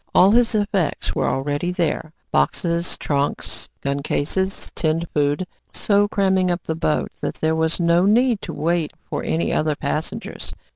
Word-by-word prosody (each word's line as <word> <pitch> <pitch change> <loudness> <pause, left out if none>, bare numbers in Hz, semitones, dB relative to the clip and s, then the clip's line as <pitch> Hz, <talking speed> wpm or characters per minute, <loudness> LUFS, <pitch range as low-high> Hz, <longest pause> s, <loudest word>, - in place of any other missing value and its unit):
All 190 +2 +7
his 235 0 +4
effects 200 -6 0
were - - 0
already 145 +6 -1
there 165 -3 -1 0.2
boxes, 170 - +1
trunks, 140 -1 -2
gun 140 0 -1
cases, 190 +7 -1
tinned 160 +1 0
food, 145 +4 +1 0.3
so 205 0 +3
cramming 190 -2 +2
up 175 0 -1
the 160 - -2
boat 155 -1 0
that - - -2
there 160 0 +1
was 160 +1 0
no 170 +1 +4
need 235 +1 +3
to - - -5
wait 165 +1 0
for - - -3
any 165 - 0
other 155 -1 +1
passengers. 150 +2 -4
170 Hz, 155 wpm, -22 LUFS, 150-190 Hz, 0.3 s, All